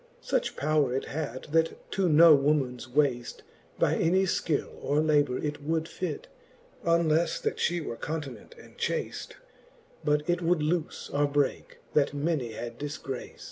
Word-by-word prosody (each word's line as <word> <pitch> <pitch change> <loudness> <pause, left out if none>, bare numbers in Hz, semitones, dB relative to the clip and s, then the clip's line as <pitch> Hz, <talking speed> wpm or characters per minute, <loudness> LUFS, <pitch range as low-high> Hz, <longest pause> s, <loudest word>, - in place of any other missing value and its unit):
Such - - -1
power 145 -4 +1
it 135 - -1
had, 140 -4 -4
that 165 +1 0
to 195 -2 +1
rw 160 0 +8
womans 130 -4 0
waft 125 -3 0 0.3
By - - +2
any 185 +3 +3
Ikill 170 -4 -1
or 145 +1 +1
labour 145 -4 +3
it 150 -1 -3
would 160 +2 -1
fit, 165 -5 -5 0.6
UnlelTe 170 -1 +2
that - - -1
fhe 175 -2 0
were 115 - -5
continent 145 -7 -6
and - - -16
chaft, - - -3 0.7
But 150 0 +1
it 175 -1 +2
woald 170 -2 +1
lofe 165 -1 -2
or 145 0 +1
brcake, 145 -1 0 0.2
that 145 -1 +2
many 140 -6 -1
had 120 +1 -7
dilgraft. 145 -3 -6
150 Hz, 150 wpm, -28 LUFS, 140-165 Hz, 0.7 s, rw